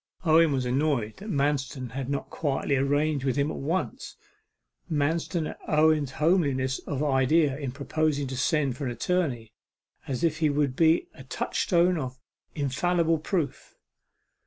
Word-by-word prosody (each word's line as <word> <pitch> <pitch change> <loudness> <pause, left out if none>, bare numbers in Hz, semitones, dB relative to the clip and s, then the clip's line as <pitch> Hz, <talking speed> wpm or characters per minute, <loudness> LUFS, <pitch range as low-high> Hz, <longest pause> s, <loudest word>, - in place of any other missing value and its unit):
Owen 160 0 +5
was 130 -2 0
annoyed 125 -4 0
that 210 +3 -8
Manston 140 - -1
had 130 +1 -4
not 140 -1 -3
quietly 140 -2 -1
arranged 145 +1 +1
with 130 -2 0
him 145 +2 +1
at - - -6
once; 165 +7 -3 0.8
Manston 160 +2 0
at - - -13
Owen's 155 -3 +3
homeliness 140 -6 +1
of 145 -1 -2
idea 140 +1 +3
in 140 -3 -4
proposing 145 +1 -1
to 130 0 -5
send 140 -1 +1
for 140 - -5
an 125 - -2
attorney, 120 -5 -1 0.5
as 130 +1 -3
if 160 -1 +1
he 155 -2 +3
would 145 -2 0
be 165 +2 +3
a 135 - -12
touchstone 175 +6 +1
of 130 -2 -5 0.4
infallible 165 +4 +1
proof. 155 -3 -3
145 Hz, 150 wpm, -27 LUFS, 130-160 Hz, 0.8 s, Owen